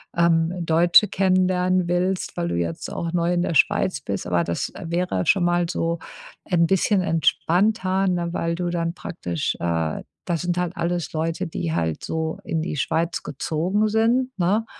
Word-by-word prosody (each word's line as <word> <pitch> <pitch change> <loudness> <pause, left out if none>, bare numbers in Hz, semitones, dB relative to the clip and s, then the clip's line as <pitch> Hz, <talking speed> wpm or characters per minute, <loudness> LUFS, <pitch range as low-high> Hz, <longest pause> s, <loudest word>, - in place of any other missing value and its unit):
ähm, 170 +1 +2
Deutsche 170 +5 +5
kennenlernen 185 -1 +2
willst, 180 +1 -1
weil 85 - -1
du 85 - -2
jetzt 85 -1 -3
auch 165 -1 -3
neu 175 0 +1
in 175 - +1
der 175 - -1
Schweiz 190 -7 +2
bist, 100 -6 -4
aber 85 -1 +2
das 85 - -3
wäre 170 - -1
schon 185 -2 +3
mal 175 -1 +1
so 170 -1 -1 0.5
ein 170 -2 +3
bisschen 195 +2 +2
entspannter, 190 +3 +1
ne? 175 -2 -1
Weil 170 -1 -1
du 175 0 -2
dann 170 -1 -1
praktisch, 85 - -3
äh 80 -2 -1 0.2
das 170 -2 -1
sind 175 0 -1
halt 180 0 -2
alles 170 0 -2
Leute, 160 +1 -2
die 85 - -3
halt 80 -2 -1
so 160 0 -3
in 160 -1 -1
die 160 - -4
Schweiz 165 +4 -1
gezogen 180 +9 -1
sind, 235 +4 +2
ne? 200 +6 +2
170 Hz, 170 wpm, -23 LUFS, 160-185 Hz, 0.5 s, Deutsche